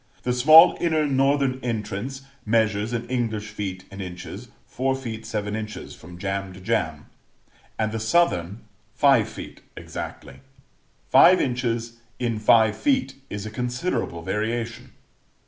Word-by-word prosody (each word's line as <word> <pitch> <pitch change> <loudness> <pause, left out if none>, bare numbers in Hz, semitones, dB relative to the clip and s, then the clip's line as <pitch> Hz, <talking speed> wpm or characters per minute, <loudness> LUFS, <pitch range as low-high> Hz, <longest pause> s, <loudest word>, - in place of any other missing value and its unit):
The 125 - 0
small 155 +7 +8
inner 160 -3 +2
northern 135 -1 +1
entrance 115 +3 -4 0.2
measures, 110 -1 +1
in 120 0 -3
English 110 -4 -2
feet 95 -3 -5
and 100 0 -7
inches, 90 -1 -8 0.2
4 130 +1 -1
ft. 115 -4 -6
7 105 -1 -3
in. 110 -1 -3 0.2
from 85 +2 -12
jamb 95 0 -3
to 95 - -12
jamb, 85 -7 -2 0.7
and 110 -1 0
the 110 - -3
southern 110 - +1 0.3
five - - +4
feet - - -10 0.2
exactly. - - -8 0.7
Five 185 +1 +7
inches 120 -2 -2 0.2
in 115 -3 -2
five 110 0 +4
feet 270 -3 +1 0.2
is 105 0 -5
a 110 - -6
considerable 125 - -3
variation. 115 +5 -3
115 Hz, 130 wpm, -24 LUFS, 105-130 Hz, 0.7 s, small